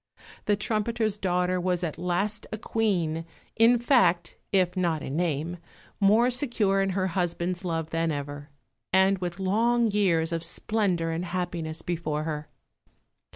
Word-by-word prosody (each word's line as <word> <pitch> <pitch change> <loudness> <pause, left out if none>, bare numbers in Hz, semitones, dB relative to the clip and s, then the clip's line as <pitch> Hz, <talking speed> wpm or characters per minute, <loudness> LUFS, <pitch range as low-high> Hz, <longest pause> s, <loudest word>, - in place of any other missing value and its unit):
The 205 - +3
trumpeter's 215 0 -1
daughter 180 -1 +1
was 180 -1 0
at 160 -3 -3
last 195 +4 -1
a 215 - -3
Queen, 180 -8 0 0.3
in 230 +2 +5
fact, 185 -9 +3 0.2
if 185 -2 +2
not 170 -4 0
in 135 - -4
name, 165 0 -1 0.4
more 220 +5 +4
secure 230 -7 +1
in 195 - +1
her 185 - +1
husband's 175 0 -1
love 165 -3 -2
than 165 0 0
ever, 145 0 -5 0.4
and 190 +1 +4
with 175 -1 -4
long 225 +4 +2
years 175 -5 +2
of 165 -1 -2
splendour 175 -2 0
and 165 +2 -2
happiness 170 -3 -4
before 160 -3 -2
her. 150 -1 -4
180 Hz, 145 wpm, -27 LUFS, 165-205 Hz, 0.4 s, in